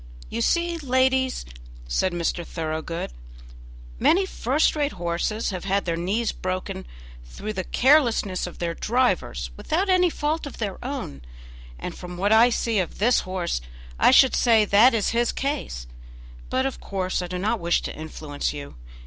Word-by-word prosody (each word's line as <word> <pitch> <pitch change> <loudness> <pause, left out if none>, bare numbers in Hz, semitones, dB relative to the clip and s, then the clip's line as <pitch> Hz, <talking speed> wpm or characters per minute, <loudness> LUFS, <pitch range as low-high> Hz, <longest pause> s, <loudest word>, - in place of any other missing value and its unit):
"You - - -2
see, 340 - +1
ladies," 260 -1 +1 0.4
said 120 - +1
Mr. 175 0 -1
Thoroughgood, 160 - -4 0.9
"many 380 +3 +4
first 290 -4 +1
rate 295 -1 0
horses 175 +5 -2
have 185 -1 -5
had 195 +1 0
their 170 -2 0
knees 200 +7 0
broken 185 - -4 0.4
through 205 - -6
the 185 - -3
carelessness 235 - +3
of 180 - -10
their 170 -1 -2
drivers 65 - 0
without 370 - -1
any 365 -1 +4
fault 305 0 -2
of 285 - -10
their 200 -4 -4
own, 255 - -5 0.6
and 60 - -5
from 180 0 -8
what 200 +3 +1
I 225 +2 +7
see 230 -2 0
of 180 - -3
this 235 +4 +3
horse 185 - -2 0.4
I - - +6
should 260 0 +6
say 225 -3 +4
that 225 +5 +6
is 215 - +1
his 235 0 +1
case; 275 - -3 0.6
but 260 +1 +1
of 270 - -3
course 185 -2 -2
I 180 - -4
do 180 +1 -4
not 210 +5 0
wish 170 0 +1
to - - -5
influence 155 -2 -4
you. 140 - -8
205 Hz, 165 wpm, -24 LUFS, 175-260 Hz, 0.9 s, I